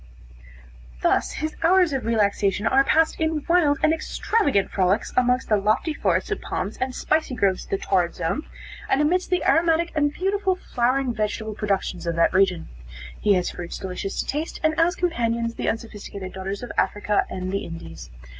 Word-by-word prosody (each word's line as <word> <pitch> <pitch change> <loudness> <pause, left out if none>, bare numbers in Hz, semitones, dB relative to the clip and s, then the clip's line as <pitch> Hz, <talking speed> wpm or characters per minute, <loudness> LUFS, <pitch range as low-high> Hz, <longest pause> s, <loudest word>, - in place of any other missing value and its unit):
Thus - - +2
his 310 0 -4
hours 350 -1 +4
of 265 -3 -2
relaxation 205 -2 +1
are 265 +4 +4
passed 320 +3 +2
in 315 -2 0
wild 335 -5 +3
and 310 - +5
extravagant 315 - 0
frolics 190 +1 +1
amongst 250 +1 +2
the 215 - +3
lofty 215 +10 +1
forests 420 - 0
of 415 - -2
palms - - -3
and 260 -1 -3
spicy 310 -4 0
groves 195 -5 +1
of - - -20
the 195 - 0
Torrid 180 -3 0
Zone, 175 - -2 0.4
and 270 - +3
amidst 355 +5 +1
the 360 -1 0
aromatic 335 +1 +3
and 290 -2 +1
beautiful 385 +3 0
flowering 255 -4 0
vegetable 215 0 -2
productions 195 -4 -2
of 170 - -1
that 170 +2 +3
region. 185 -3 +2 0.5
He 205 -1 +3
has 180 -1 0
fruits 175 -1 -6
delicious 190 +1 -5
to - - -7
taste, 300 +4 -3
and 315 0 +3
as 345 +2 +3
companions, 235 -10 -1
the - - -2
unsophisticated 205 -4 -6
daughters 195 +3 -5
of 245 - -6
Africa 205 0 +1
and 185 0 -4
the 200 - -2
Indies. 165 - -9
235 Hz, 175 wpm, -24 LUFS, 195-315 Hz, 0.5 s, and